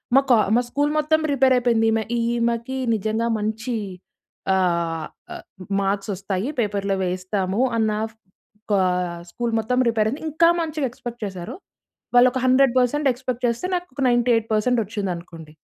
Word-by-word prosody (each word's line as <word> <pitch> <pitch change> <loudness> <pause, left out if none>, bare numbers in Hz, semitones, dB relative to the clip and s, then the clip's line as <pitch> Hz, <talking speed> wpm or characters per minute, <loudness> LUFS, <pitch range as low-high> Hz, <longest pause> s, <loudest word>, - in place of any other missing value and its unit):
మా 275 - +7
కా 245 - +7 0.2
మా 245 - +4
స్కూల్ 290 +2 0
మొత్తం 315 +1 +2
ప్రిపేర్ 265 -2 +3
అయిపోయింది. 235 -2 +2
ఈమె 220 0 +1 0.2
ఈమెకి 235 +2 -1 0.2
నిజంగా 220 +3 -1
మంచి 220 +3 -3 0.8
ఆహ్, 170 -3 0 0.3
ఆ! - - -7 0.5
మార్క్స్ 195 +1 -1
వస్తాయి. 195 +5 -3
పేపర్‌లో 200 -2 0
వేయిస్తాము 185 +3 -1 0.2
అన్న 220 -1 +2 0.8
కా 200 - +4 0.5
స్కూల్ 240 -1 -2
మొత్తం 250 +3 -1
ప్రిపేర్ 220 -2 +2
అయింది. 280 +6 -6
ఇంకా 335 +3 +4
మంచిగా 310 -4 -2
ఎక్స్‌పెక్ట్ 240 -1 -8
చేసారు. 185 - -6 0.6
వాళ్ళోక 250 +1 +5
100% 260 +2 +3
ఎక్స్‌పెక్ట్ 250 -1 -4
చేస్తే 235 +10 -1
నాకోక 350 -6 -5
98% 235 -1 +2
వచ్చింది 205 -2 -3
అనుకోండి. 165 -3 -11
230 Hz, 135 wpm, -22 LUFS, 200-255 Hz, 0.8 s, మా